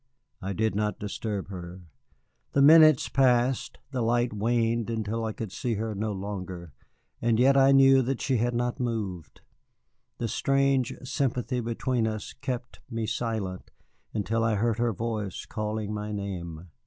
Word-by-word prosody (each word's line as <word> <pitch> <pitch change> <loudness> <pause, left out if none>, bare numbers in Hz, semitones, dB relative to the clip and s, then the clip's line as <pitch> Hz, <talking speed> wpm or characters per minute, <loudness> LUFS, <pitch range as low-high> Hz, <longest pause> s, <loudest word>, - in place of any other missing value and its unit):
I 95 +1 -3
did 110 +3 0
not 105 +1 -1
disturb 105 -1 -4
her. 90 -1 -8 0.7
The 140 - +3
minutes 155 -1 +7
passed, 125 -1 +2
the 130 -3 -2
light 120 +1 +1
waned 115 +1 0
until 115 0 -2
I 110 - -1
could 110 -2 -6
see 115 +2 -2
her 110 +1 -2
no 105 +2 -2
longer, 95 -5 -6 0.5
and 115 -1 +2
yet 135 +2 +5
I 135 0 +6
knew 135 -1 +7
that 130 0 -1
she 130 -2 +1
had 120 +2 0
not 120 0 -1
moved. 105 - -4 0.8
The 115 - -2
strange 135 +1 +1
sympathy 130 -2 -1
between 120 0 -1
us 110 -1 -4
kept 130 -2 -5
me 115 -2 -2
silent 110 -5 -3 0.4
until 115 +2 -1
I 115 -1 +2
heard 115 +2 0
her 120 -1 +2
voice 110 -2 -4
calling 105 -1 -3
my 105 0 -4
name. 90 -5 -5
115 Hz, 155 wpm, -27 LUFS, 105-125 Hz, 0.8 s, minutes